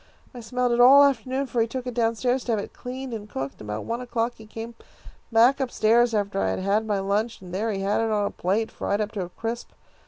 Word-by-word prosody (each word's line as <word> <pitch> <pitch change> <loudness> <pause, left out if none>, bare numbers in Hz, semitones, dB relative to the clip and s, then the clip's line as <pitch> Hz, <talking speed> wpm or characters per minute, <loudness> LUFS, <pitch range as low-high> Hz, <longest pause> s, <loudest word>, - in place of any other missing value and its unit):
I 250 - -8
smelled 250 +2 -1
it 235 - +1
all 270 +4 +9
afternoon, 265 0 +1
for 240 -2 -1
he 225 - +2
took 255 +2 -5
it 250 - -4
down 230 -1 +1
stairs 250 +3 0
to 235 - 0
have 215 - +1
it - - -7
cleaned 255 0 -6
and 210 -2 -6
cooked. 135 -4 -5
About 105 0 -4
one 235 +2 -3
o'clock 240 -1 -1
he 220 - -13
came 225 +2 -7 0.6
back 240 +5 +5
up 265 - 0
stairs 235 +1 +3
after 200 -1 -1
I - - +1
had - - -1
had 205 +3 +1
my 205 -2 +1
lunch, 205 +4 -1
and 180 -2 -11
there 215 +4 -1
he 195 -2 -3
had 200 +3 +1
it 225 - 0
on 210 -1 +1
a - - -2
plate, 205 +5 -1
fried 200 - -2
up 210 -1 -1
into 195 - -1
a - - -11
crisp. 230 +5 -5
225 Hz, 260 wpm, -25 LUFS, 205-245 Hz, 0.6 s, all